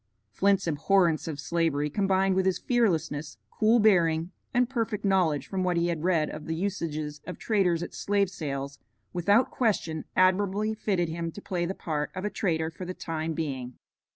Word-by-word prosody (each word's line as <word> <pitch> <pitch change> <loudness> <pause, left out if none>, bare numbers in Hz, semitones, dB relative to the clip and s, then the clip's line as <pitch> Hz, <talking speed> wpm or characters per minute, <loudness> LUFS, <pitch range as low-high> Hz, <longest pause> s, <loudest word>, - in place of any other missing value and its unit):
Flint's 195 - +2
abhorrence 165 +1 +2
of 150 -3 -4
Slavery 150 0 0
combined 195 +3 +2
with 190 0 +2
his 190 - +2
fearlessness, 165 - 0
cool 220 +2 +3
bearing, 170 -5 +3 0.2
and 245 0 +2
perfect 225 -5 -2
knowledge 175 -8 +2
from 190 -1 -2
what 180 -1 +1
he 170 +1 +1
had 165 -2 -2
read 170 -4 +2
of 155 - -8
the 160 - -1
usages 155 -5 -3
of 180 - -6
traders 180 -6 +1
at - - -7
slave 200 -2 0
sales, 140 -4 -5 0.3
without 200 +7 +3
question 180 -9 0
admirably 200 +3 +2
fitted 190 -6 -1
him 165 0 -3
to - - -8
play 175 -2 -2
the 190 - -3
part 150 -2 -2
of 185 +2 -4
a 210 - -1
trader 160 -4 -1
for 175 - -8
the 185 0 -5
time 160 0 -3
being. 135 -6 -4
175 Hz, 180 wpm, -28 LUFS, 160-195 Hz, 0.3 s, cool